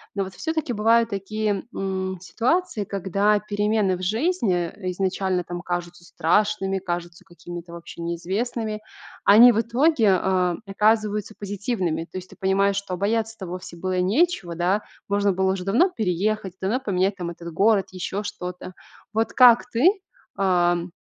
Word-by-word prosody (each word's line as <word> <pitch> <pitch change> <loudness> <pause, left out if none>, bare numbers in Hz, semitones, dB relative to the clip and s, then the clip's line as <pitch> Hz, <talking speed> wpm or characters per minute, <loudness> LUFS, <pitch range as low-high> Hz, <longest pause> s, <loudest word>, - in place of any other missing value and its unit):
Но 195 - 0
вот 190 0 -8
всё-таки 315 - -2
бывают 230 +1 +3
такие, 205 0 -2
м, 190 -1 -2
ситуации, 245 - 0
когда 200 +2 +1
перемены 205 -2 0
в - - -9
жизни 210 - 0
изначально 185 -1 -1
там 175 +1 -6
кажутся 175 0 -5
страшными, 195 +3 +1
кажутся 175 -2 -5
какими-то 175 -1 -10
вообще 170 0 -9
неизвестными, 215 +6 -3 0.4
они 230 +5 +9
в 225 - +1
итоге, 235 - +3
а, 180 -1 +1
оказываются 210 +1 +1
позитивными. 200 -5 -2
То 185 - -9
есть, 185 - -13
ты - - -15
понимаешь, 195 +1 +2
что 200 -2 -3
бояться-то 220 +1 -1
вовсе 180 0 -7
было 185 +1 -2
и - - +2
нечего 200 - +1
да, 185 +5 +1 0.3
можно 200 -1 +2
было 190 +1 +1
уже 185 -1 -4
давно 290 - +3
переехать, 200 - -1
давно 215 +7 0
поменять 195 -4 0
там 175 -1 -4
этот 170 0 -9
город, 200 +2 +3
ещё 190 +2 -4
что-то. 180 -1 -6 0.4
Вот 225 +1 0
как 245 -1 +6
ты, 255 +11 +4 0.5
ам, 175 -2 +1
195 Hz, 150 wpm, -24 LUFS, 180-215 Hz, 0.5 s, они